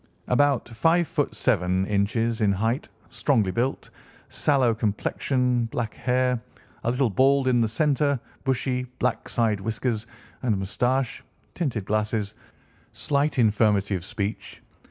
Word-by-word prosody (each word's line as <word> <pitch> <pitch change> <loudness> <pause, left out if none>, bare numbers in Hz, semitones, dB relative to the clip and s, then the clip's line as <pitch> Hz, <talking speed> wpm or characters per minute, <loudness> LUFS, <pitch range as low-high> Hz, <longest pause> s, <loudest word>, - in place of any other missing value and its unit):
About 140 0 +2
five 165 +9 +2
ft. - - -1
seven 90 +2 +1
in. 100 0 +1
in 115 -2 +1
height; 115 +7 -1 0.2
strongly 110 -10 +1
built, 125 +6 -2 0.4
sallow 135 -5 +2
complexion, 120 +3 0
black 115 -1 -3
hair, 125 -1 0 0.4
a - - +1
little 125 -1 +1
bald 135 +5 +3
in 125 -2 +3
the 115 - +3
centre, 140 +3 +1 0.2
bushy, 125 -1 0
black - - -1
side 110 -4 +1
whiskers 115 +1 -2 0.3
and 115 -6 +1
moustache; 125 +6 -1 0.3
tinted 125 - -2
glasses, 105 0 -1 0.6
slight 145 +1 0
infirmity 105 -3 +3
of 90 -3 -2
speech. 100 +3 -5
115 Hz, 125 wpm, -25 LUFS, 105-130 Hz, 0.6 s, bald